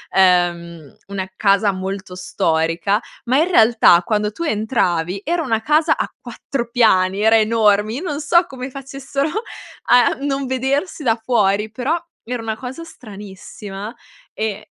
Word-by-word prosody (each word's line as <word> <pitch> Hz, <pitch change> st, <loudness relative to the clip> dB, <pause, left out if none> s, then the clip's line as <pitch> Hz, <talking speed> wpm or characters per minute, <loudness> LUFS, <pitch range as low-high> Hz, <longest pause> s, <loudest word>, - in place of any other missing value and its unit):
ehm, 175 Hz, -4 st, +1 dB
una 195 Hz, -1 st, -4 dB
casa 200 Hz, 0 st, +2 dB
molto 190 Hz, 0 st, -6 dB
storica, 170 Hz, +2 st, 0 dB, 0.2 s
ma, 255 Hz, +3 st, +2 dB
in 340 Hz, +3 st, +2 dB
realtà, 220 Hz, -, +5 dB
quando 210 Hz, 0 st, -1 dB
tu 335 Hz, -, -6 dB
entravi, 200 Hz, -, -1 dB
era 340 Hz, +1 st, 0 dB
una 225 Hz, -4 st, -1 dB
casa 305 Hz, +6 st, +2 dB
a -, -, -2 dB
4 240 Hz, -4 st, -5 dB
piani, 195 Hz, -5 st, +3 dB
era 220 Hz, +1 st, +5 dB
enorme. 215 Hz, -1 st, +2 dB
Io 275 Hz, -, -4 dB
non 295 Hz, -4 st, -3 dB
so 340 Hz, +4 st, +3 dB
come 260 Hz, 0 st, -7 dB
facessero 275 Hz, +2 st, -4 dB, 0.6 s
a 245 Hz, +1 st, +5 dB
non 275 Hz, -1 st, -2 dB
vedersi 275 Hz, +6 st, -2 dB
da 225 Hz, -3 st, +2 dB
fuori. 210 Hz, -3 st, +1 dB
Però 260 Hz, +8 st, -1 dB, 0.3 s
era 240 Hz, 0 st, -4 dB
una 220 Hz, -1 st, -3 dB
cosa 260 Hz, +6 st, -7 dB
stranissima 205 Hz, -, -10 dB, 0.4 s
e 215 Hz, -1 st, -4 dB
220 Hz, 140 wpm, -19 LUFS, 195-265 Hz, 0.6 s, realtà